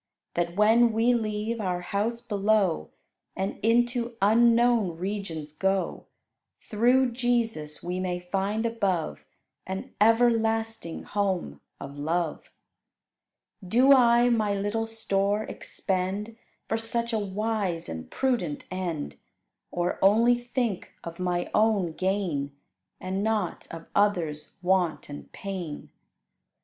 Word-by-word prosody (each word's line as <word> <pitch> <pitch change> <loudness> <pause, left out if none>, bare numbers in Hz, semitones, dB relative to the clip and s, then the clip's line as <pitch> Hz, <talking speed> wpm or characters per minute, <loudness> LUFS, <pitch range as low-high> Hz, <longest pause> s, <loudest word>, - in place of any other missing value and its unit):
That 170 0 -1
when 225 +3 +5
we 230 +3 +3
leave 220 0 -2
our 180 -3 -1
house 215 +6 -2
below, 200 - +1 0.5
And 190 +1 -3
into 240 +1 +1
unknown 230 -3 +4
regions 175 -5 -4
go, 190 +4 -1 0.5
Through 245 +4 +2
Jesus, 230 -11 -1
we 180 +1 -3
may 180 -1 -2
find 195 +5 -2
above 195 - -1 0.4
An 190 +1 -5
everlasting 225 -4 +2
home 190 - -2 0.2
of 140 +1 -8
love. 165 +1 -2 1.1
Do 245 +9 +5
I 240 -2 +5
my 215 -4 +1
little 205 +3 -1
store 205 -2 0
expend 195 +2 -3 0.3
For 225 - 0
such 235 +1 -1
a 220 - +2
wise 200 -3 -2
and 80 0 -7
prudent 235 - -1
end; 175 -5 -4 0.5
Or 175 0 -2
only 225 +5 +5
think 240 -4 -2
of 170 +1 -8
my 180 -1 -1
own 210 -5 +2
gain, 175 -7 -1 0.4
And 190 +2 -3
not 215 -5 -1
of 165 0 -8
others' 175 -7 0
want 180 -4 +1
and 145 - -9
pain? 185 -6 -6
205 Hz, 115 wpm, -27 LUFS, 180-225 Hz, 1.1 s, when